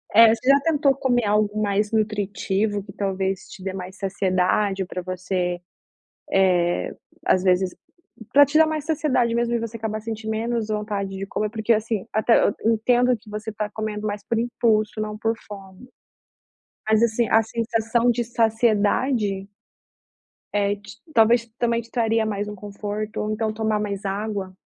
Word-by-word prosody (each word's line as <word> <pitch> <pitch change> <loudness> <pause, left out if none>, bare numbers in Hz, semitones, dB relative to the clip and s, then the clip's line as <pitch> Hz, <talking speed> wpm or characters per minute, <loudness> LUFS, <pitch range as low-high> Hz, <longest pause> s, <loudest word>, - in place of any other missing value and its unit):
É. 230 0 +9
Você 230 +3 -5
já 275 +1 +7
tentou 290 -4 +2
comer 245 -4 +1
algo 210 0 +1
mais 205 +1 0
nutritivo 205 -1 0
que 195 -1 -12
talvez 195 -2 -2
te 190 - -11
dê 190 -1 -3
mais 185 0 -7
saciedade, 190 0 0
pra 180 - -5
você, 185 +1 -4 0.2
eh, 175 - -14 1.7
às 185 - +3
vezes, 185 0 +2 0.6
pra 285 0 +8
te 295 +3 +1
dar 320 - +7
mais 310 -2 -3
saciedade 265 -7 +1
mesmo 235 0 0
e - - +1
você 230 0 -5
acabar 215 -1 -3
sentir 220 0 -6
menos 225 0 -1
vontade 210 -2 -2
de 195 - -4
comer? 210 +1 -2
Porque 220 +1 -1
assim, 220 -2 -1
até 220 +2 +3
eu - - +2
entendo 245 +2 +3
que 215 0 -17
você 215 +1 -5
tá 210 0 -3
comendo 215 -1 -4
mais 205 0 -4
por 230 - 0
impulso, 225 -2 +1
não 215 0 -3
por 225 +1 0
fome. 195 +3 -11 1.0
Mas 220 +1 +4
assim, 235 0 +2
a 225 +2 +5
sensação 230 +1 0
de 240 0 0
saciedade 220 -2 +1 1.1
é 205 0 +1
te 205 +2 -13 0.2
talvez 230 +1 +4
também 235 -1 +1
te 230 - -19
traria 225 -2 +1
mais 205 -1 -2
um 210 - -6
conforto, 205 +1 -5
ou 210 0 -2
então 220 0 -1
tomar 220 -1 0
mais 200 -1 -4
água. 195 -1 -3
215 Hz, 165 wpm, -23 LUFS, 205-230 Hz, 1.7 s, É